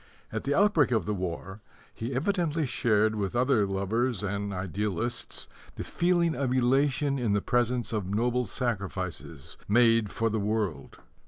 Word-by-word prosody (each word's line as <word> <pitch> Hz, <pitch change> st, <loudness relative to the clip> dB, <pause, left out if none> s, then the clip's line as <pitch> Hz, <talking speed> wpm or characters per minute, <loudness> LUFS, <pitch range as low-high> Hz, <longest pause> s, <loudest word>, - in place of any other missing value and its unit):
At -, -, -4 dB
the 140 Hz, +1 st, +1 dB
outbreak 195 Hz, -, +4 dB
of 110 Hz, -7 st, +1 dB
the 105 Hz, -, -1 dB
war 95 Hz, +2 st, -5 dB, 0.3 s
he 120 Hz, +3 st, -5 dB
evidently 165 Hz, 0 st, 0 dB
shared 110 Hz, -4 st, +2 dB
with 105 Hz, 0 st, -3 dB
other 120 Hz, -4 st, +3 dB
lovers 105 Hz, +4 st, -1 dB
and 100 Hz, 0 st, -2 dB
idealists 100 Hz, +4 st, -3 dB, 0.3 s
the -, -, -5 dB
feeling 175 Hz, -1 st, +1 dB
of 135 Hz, -3 st, -1 dB
elation 135 Hz, +2 st, +2 dB
in 115 Hz, -5 st, +1 dB
the 105 Hz, -, +3 dB
presence 120 Hz, 0 st, 0 dB
of 105 Hz, -4 st, -2 dB
noble 120 Hz, +3 st, 0 dB
sacrifices 95 Hz, -, -4 dB
made 115 Hz, -1 st, +4 dB
for 115 Hz, +2 st, -1 dB
the 110 Hz, -, 0 dB
world. 105 Hz, -4 st, -2 dB
115 Hz, 150 wpm, -28 LUFS, 100-130 Hz, 0.3 s, outbreak